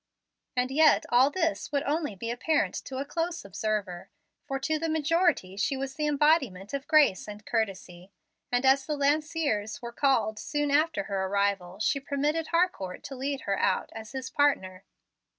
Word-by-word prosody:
And 250 +1 +1
yet 310 +3 +5
all 250 +3 +5
this 330 0 -1
would 280 -1 0
only 295 -6 -1
be 230 +5 -4
apparent 295 +6 0
to 260 - -6
a 275 - -2
close 335 - -3
observer, 200 -2 -3 0.4
for 270 - -2
to 310 +3 -1
the 325 +1 -2
majority 315 - +1
she 270 +7 0
was 270 0 -4
the 300 +1 -2
embodiment 280 - +2
of 280 0 -4
grace 300 - +4
and 210 0 -9
courtesy, 195 -4 -3 0.4
and 245 +2 +1
as 270 +1 +4
the 300 -2 -1
Lanciers 285 -6 0
were 235 -1 -7
called 235 -6 +1
soon 295 -1 -1
after 305 +1 +2
her 195 -5 -2
arrival, 195 -2 -1
she 220 +5 +1
permitted 295 +3 -1
Harcourt 335 - -1
to 270 - -7
lead 270 +1 -3
her 195 -1 -1
out - - 0
as 220 -1 -9
his 260 -1 -5
partner. 195 -11 +1
270 Hz, 170 wpm, -28 LUFS, 210-300 Hz, 0.4 s, yet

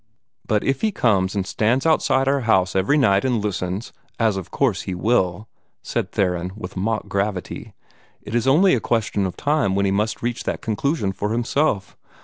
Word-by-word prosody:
"But 105 -1 +1
if 135 0 0
he 220 - +1
comes 100 - +1
and 100 -2 -1
stands 110 - 0
outside 135 -4 +2
our 140 +1 +2
house 95 -7 +2
every 95 +11 +2
night 100 -8 +3
and 125 -3 +1
listens 100 0 -3 0.2
as 110 -3 +2
of 95 -3 -6
course 120 -9 0
he 95 - -4
will," 100 0 0 0.4
said - - -3
Theron, 90 -1 -1
with 110 - -8
mock 105 +2 -2
gravity, 100 -1 -3 0.5
"it - - -8
is 120 +1 +1
only 170 +8 +5
a 125 - +2
question 110 -4 0
of 90 - -7
time 145 -10 +1
when 100 0 +1
he 95 - +1
must 105 +4 -1
reach 120 0 -2
that - - -2
conclusion 115 0 -1
for 105 +2 -3
himself. 120 -3 0
105 Hz, 185 wpm, -22 LUFS, 95-125 Hz, 0.5 s, only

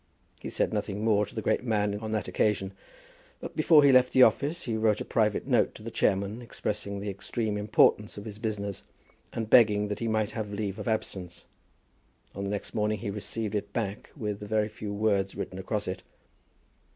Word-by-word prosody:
He - - -6
said - - 0
nothing 100 +2 -2
more 105 -2 +3
to - - -14
the 110 - -3
great - - +1
man 105 -3 0
on 110 0 -5
that 110 -5 -1
occasion, 95 +1 0 0.7
but - - -8
before 155 -1 +6
he 140 - +7
left 130 -1 +5
the 130 - +8
office 145 +9 +2
he 115 - -2
wrote 110 -1 +2
a - - -4
private 105 -2 +1
note - - +2
to - - -11
the - - -6
chairman 100 +4 0
expressing 105 -3 -4
the 100 +1 -4
extreme 105 +2 -3
importance 105 0 +3
of 105 - -7
his 105 -1 -8
business, 100 -3 -3 0.5
and 115 -1 -3
begging 105 -3 +5
that 105 0 -3
he 115 - -2
might 110 -1 0
have 110 -3 -4
leave 100 -1 -3
of - - -5
absence. 95 -5 -3 0.9
On 100 - -5
the 100 - -2
next 100 0 -4
morning 105 -1 0
he 105 0 -4
received 105 +1 -4
it 105 - -3
back 105 -3 -3
with 105 -5 -3
a 105 - -6
very 110 0 +1
few 105 -1 -6
words 100 -2 0
written - - -5
across - - -2
it. - - -4
105 Hz, 200 wpm, -28 LUFS, 100-110 Hz, 0.9 s, the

